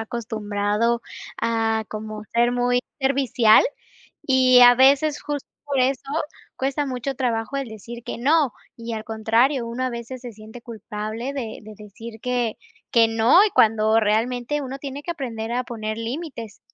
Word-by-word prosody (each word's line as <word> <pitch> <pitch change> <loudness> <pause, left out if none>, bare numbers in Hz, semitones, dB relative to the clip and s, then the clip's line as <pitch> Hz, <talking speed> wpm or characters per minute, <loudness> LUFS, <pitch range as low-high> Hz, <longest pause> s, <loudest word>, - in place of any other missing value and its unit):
acostumbrado 220 0 -1 0.4
a 225 -1 0
como 215 0 -7
ser 240 +1 +3
muy 245 0 +1 0.2
servicial 265 -5 +4 0.6
y 255 -2 +5
a 245 0 +9
veces 280 +3 +4
justo 290 -2 -5 0.2
por 280 -2 -1
eso 260 +1 +1 0.5
cuesta 275 +2 -1
mucho 260 +1 -4
trabajo 240 0 -2
el 275 -3 -3
decir 235 +2 -9
que - - -6
no. 290 0 +3 0.2
Y, 230 0 -6
al 220 -1 -5
contrario, 230 +4 +1
uno 235 +2 -4
a 255 - 0
veces 235 +1 -7
se 245 -2 -7
siente 220 +3 -12
culpable 220 +3 -6
de 235 -6 -5
de 215 0 -10
decir 220 +2 -11
que 245 -3 -1 0.3
que 230 -1 +5
no 225 - +5
y 430 - +2
cuando 220 - +3
realmente 240 +6 0
uno 270 0 -5
tiene 280 0 -7
que 345 - -9
aprender 235 -8 -4
a 250 +1 0
poner 215 -2 -5
límites. 230 - -6
235 Hz, 160 wpm, -23 LUFS, 220-260 Hz, 0.6 s, a